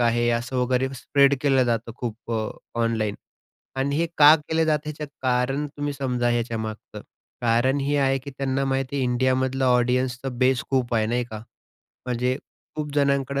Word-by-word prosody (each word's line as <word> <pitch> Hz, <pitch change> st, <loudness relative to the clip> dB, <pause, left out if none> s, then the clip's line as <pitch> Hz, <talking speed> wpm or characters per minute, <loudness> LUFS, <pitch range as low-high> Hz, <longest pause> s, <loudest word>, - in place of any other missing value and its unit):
आहे 120 Hz, 0 st, +2 dB
असं 130 Hz, +2 st, -5 dB
वगैरे 125 Hz, +1 st, +1 dB
स्प्रेड 140 Hz, +2 st, +3 dB
केलं 135 Hz, -3 st, +3 dB
जातं 115 Hz, -1 st, -1 dB
खूप 120 Hz, -1 st, -6 dB
अ, 110 Hz, -1 st, -1 dB, 0.3 s
ऑनलाईन 110 Hz, -3 st, 0 dB, 0.6 s
आणि 140 Hz, +1 st, 0 dB
हे 170 Hz, +2 st, +1 dB
का 150 Hz, +1 st, +9 dB
केलं 160 Hz, +1 st, -1 dB
जात 150 Hz, -1 st, 0 dB
याचं 150 Hz, 0 st, -5 dB, 0.2 s
कारण 130 Hz, +3 st, +1 dB
तुम्ही 145 Hz, 0 st, -2 dB
समजा 125 Hz, -3 st, -1 dB
ह्याच्यामागचं. 115 Hz, -2 st, -3 dB, 0.4 s
कारण 120 Hz, +4 st, +2 dB
हे 145 Hz, +1 st, 0 dB
आहे, 135 Hz, -1 st, +2 dB
की 140 Hz, +2 st, -9 dB
त्यांना 135 Hz, 0 st, -1 dB
माहिती 135 Hz, 0 st, -1 dB
आहे 135 Hz, -, 0 dB
इंडियामधलं 130 Hz, +1 st, +1 dB
ऑडियन्सचा 125 Hz, +1 st, +1 dB
बेस 130 Hz, 0 st, +3 dB
खूप 125 Hz, -3 st, +1 dB
आहे 110 Hz, -1 st, +2 dB
नाही 120 Hz, +2 st, 0 dB
का, 110 Hz, -2 st, -8 dB, 0.7 s
म्हणजे 125 Hz, +1 st, 0 dB, 0.4 s
खूप 150 Hz, -1 st, -3 dB
जणांकडं 140 Hz, -1 st, +1 dB
130 Hz, 160 wpm, -24 LUFS, 120-140 Hz, 0.7 s, का